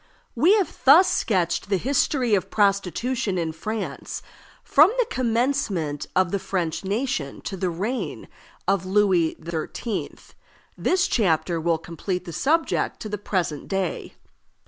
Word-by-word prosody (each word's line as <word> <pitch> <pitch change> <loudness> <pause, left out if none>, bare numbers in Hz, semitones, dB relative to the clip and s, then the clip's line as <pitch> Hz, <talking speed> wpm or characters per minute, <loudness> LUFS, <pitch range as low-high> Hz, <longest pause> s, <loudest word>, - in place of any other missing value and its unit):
We 330 - +5
have 400 -4 -1
thus 325 +8 +8
sketched 185 -3 0
the 195 - +2
history 255 - +1
of 195 - +1
prostitution 200 +2 0
in 165 -2 -1
France 215 +7 -5 0.4
from 310 +7 +6
the - - +3
commencement 230 - 0
of 185 -2 +3
the 200 - 0
French 175 -4 -2
nation 195 - -2
to 195 - -5
the 185 -1 -1
reign 205 +10 -3 0.4
of 195 -2 +2
Louis 185 -4 +2
XIII. 170 +6 -4 0.6
This 370 0 +1
chapter 170 -5 +1
will 165 0 +1
complete 175 +3 -4
the 170 - -7
subject 320 - 0
to 215 - -5
the 210 -1 -4
present 175 -8 -2
day. 195 -3 -3
195 Hz, 135 wpm, -24 LUFS, 170-245 Hz, 0.6 s, thus